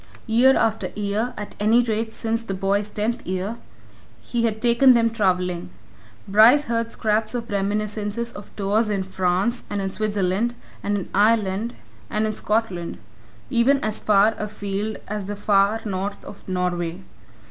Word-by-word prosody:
Year 245 +4 +5
after 225 -1 +1
year 210 +4 -1
at 210 - -6
any 225 +4 +4
rate 225 -1 -1
since 225 +1 -2
the 200 -4 -4
boy's 200 +2 0
tenth 225 +3 -2
year 190 +5 -3 0.6
he 235 -1 -1
had 220 -1 -1
taken 240 +2 +5
them 230 -1 +3
travelling; 180 -4 0 0.6
Bryce 225 +8 +6
heard 230 0 -1
scraps 215 +1 0
of 235 -2 -4
reminiscences 210 +3 -2
of 205 - -10
tours 210 +2 +1
in 200 -2 0
France, 190 +5 0
and 205 - -2
in 195 -1 -2
Switzerland, 210 +2 0 0.3
and 205 0 0
in 195 - -5
Ireland, 210 +2 +2 0.3
and 215 +1 0
in 215 - -1
Scotland 210 -6 -2 0.5
even 260 +4 +4
as 215 0 -2
far 210 +1 +4
afield 210 0 -3
as 210 -1 -4
the 205 +1 -4
far 205 +1 +2
north 200 0 -4
of 200 - -11
Norway. 180 -1 -2
210 Hz, 150 wpm, -23 LUFS, 195-230 Hz, 0.6 s, Bryce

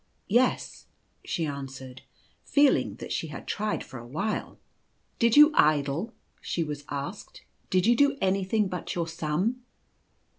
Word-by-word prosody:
" - - -45
Yes," 255 - -2 0.4
she 165 - -2
answered, 135 -3 -7 0.4
feeling 285 -1 +3
that - - -8
she - - -2
had - - -8
tried 215 0 -2
for 130 - -10
a 120 - -11
while. 160 - -3
u - - -25 0.6
Did 235 +2 +3
you 300 +1 +9
idle 150 - +2
?" - - -42
she 170 - -2
was 150 -2 -5
asked, 145 +8 -6
" - - -41
Did 185 -1 +2
you 240 +2 +5
do 280 +2 +3
anything 195 +2 +1
but 180 -1 -5
your 170 -2 -1
sum 165 +8 -1
175 Hz, 160 wpm, -27 LUFS, 145-220 Hz, 0.6 s, you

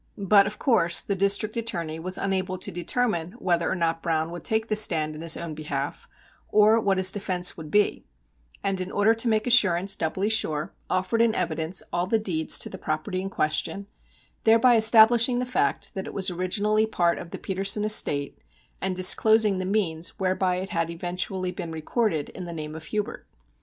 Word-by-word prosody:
But, 200 0 +4
of 210 - -6
course, 175 -10 +1
the 200 - -2
District 200 +2 +1
Attorney 170 -9 -3
was 185 +3 -1
unable 185 -1 -2
to 185 - -4
determine 175 -2 -1
whether 170 -2 -1
or - - -1
not 165 -2 -1
Browne 160 -1 -1
would 175 -1 -8
take 220 0 0
the 215 - 0
stand 160 -7 +3
in 155 - -9
his 165 -1 +2
own 170 -2 -6
behalf, 145 -2 -5 0.4
or 215 +2 +4
what 195 -2 +1
his 185 0 +4
defence 185 -3 -2
would 160 -2 -9
be, 205 +4 +1 0.6
and, 195 -1 -1
in 185 - -4
order 205 +2 +3
to 230 +2 -2
make 215 -1 +1
assurance 195 -6 +3
doubly 185 +5 -2
sure, 165 -6 0 0.2
offered 185 +5 0
in 230 -1 +2
evidence 165 0 -2
all 175 +1 -1
the 225 - +2
deeds 170 -7 +2
to - - -2
the - - -9
property 155 +4 -3
in 195 - -5
question, 155 +4 -2 0.6
thereby 230 +2 +5
establishing 230 +2 +5
the 250 - -1
fact 250 - -1
that 190 -3 -6
it - - -9
was 190 -1 +1
originally 205 +5 0
part 175 -5 0
of 170 - -9
the - - -7
Petersen 195 +2 -1
estate, 145 -10 0 0.4
and 190 0 -1
disclosing 210 +2 +4
the 185 - -3
means 180 -5 -1
whereby 185 -1 0
it 190 +2 -5
had 165 -1 -2
eventually 180 +2 -3
been 170 -2 -6
recorded 160 - -2
in 180 - -8
the 170 - -7
name 155 -1 -6
of 160 0 -9
Hubert. 210 -1 -5
185 Hz, 190 wpm, -25 LUFS, 170-215 Hz, 0.6 s, thereby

